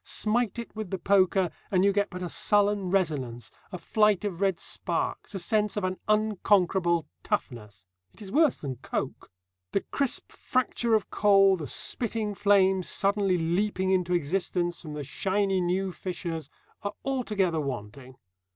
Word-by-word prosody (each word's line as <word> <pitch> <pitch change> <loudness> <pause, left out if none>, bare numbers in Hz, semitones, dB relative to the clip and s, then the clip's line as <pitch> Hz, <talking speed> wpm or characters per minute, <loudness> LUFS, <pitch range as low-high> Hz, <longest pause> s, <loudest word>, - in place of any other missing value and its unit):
Smite 225 0 0
it 235 -1 -7
with 215 -3 -5
the 190 - -2
poker, 190 -1 +3 0.2
and 185 0 +3
you 200 - +4
get 205 +1 +1
but 180 0 -6
a - - -2
sullen 205 +1 +1
resonance, 145 - -1 0.2
a 180 - -4
flight 210 +1 +2
of 190 -3 -4
red 195 -3 +1
sparks, - - -2
a - - -1
sense 210 +3 0
of 205 - -1
an 185 0 -2
unconquerable 190 -5 +2 0.2
toughness. 105 -7 -4 0.3
It - - -21
is 200 -3 -8
worse 300 +1 +4
than 135 -4 -5
coke. 130 - -5 0.4
The 200 - +2
crisp 275 -3 0
fracture 240 -2 0
of 215 - -1
coal, 195 -2 +5
the 155 -5 -6
spitting 220 - -2
flames 190 -2 +3
suddenly 200 -2 +2
leaping 185 +3 0
into 180 -1 +2
existence 175 +1 -1
from 155 -3 -8
the 150 -1 -5
shiny 195 +6 0
new 185 +2 0
fissures, 170 -3 -5 0.3
are 205 0 -3
altogether 210 -11 0
wanting. 130 -1 -6
190 Hz, 155 wpm, -27 LUFS, 175-205 Hz, 0.4 s, coal